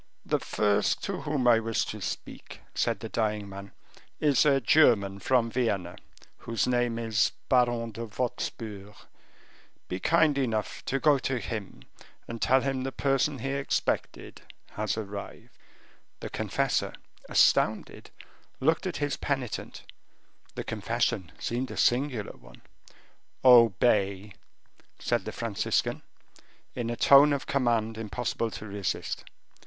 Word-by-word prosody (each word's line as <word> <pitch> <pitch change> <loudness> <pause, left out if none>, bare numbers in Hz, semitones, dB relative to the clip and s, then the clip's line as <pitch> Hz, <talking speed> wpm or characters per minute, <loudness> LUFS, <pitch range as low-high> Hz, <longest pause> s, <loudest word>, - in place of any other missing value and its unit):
"The - - +1
first 105 0 +1
to 195 -2 -3
whom 145 -5 -1
I 115 -2 +6
wish 115 0 -1
to 105 - -7
speak," - - -7
said - - 0
the - - -6
dying 105 -2 -1
man, 100 0 -9 0.5
"is 150 0 +3
a 140 -2 +4
German 110 -8 +4
from 115 +1 +1
Vienna, 100 -8 -1 0.4
whose 115 -3 -1
name 120 -2 0
is 110 -3 +1 0.2
Baron 120 -2 +2
de 115 +2 -6
Wostpur. 105 -3 -5 0.9
Be 90 - -4
kind 155 - +3
enough 110 -5 -2
to 135 - -1
go 145 -1 +4
to 130 0 -1
him, 110 -4 -6 0.4
and 115 -1 -7
tell 130 0 +4
him 135 -1 -1
the 135 +1 -3
person 135 +1 0
he 135 +3 -4
expected 140 0 -2 0.3
has 110 +1 -2
arrived." 100 -2 -7 0.7
The - - -7
confessor, - - -1 0.3
astounded, - - +2 0.5
looked 160 +6 +1
at 180 - -3
his 145 -1 -1
penitent; 135 -5 -4 0.7
the - - -4
confession 90 -5 -2
seemed 125 +2 -3
a - - -7
singular 125 -3 +1
one. - - -17 0.8
"Obey," 105 -4 +4 0.6
said - - -1
the - - -4
Franciscan, - - -1 0.7
in 120 -2 -3
a 120 - -2
tone 140 +4 +7
of 140 -1 -1
command 115 -4 0
impossible 115 +1 -2
to 110 - -8
resist. 100 -4 -3
115 Hz, 130 wpm, -28 LUFS, 105-135 Hz, 0.9 s, tone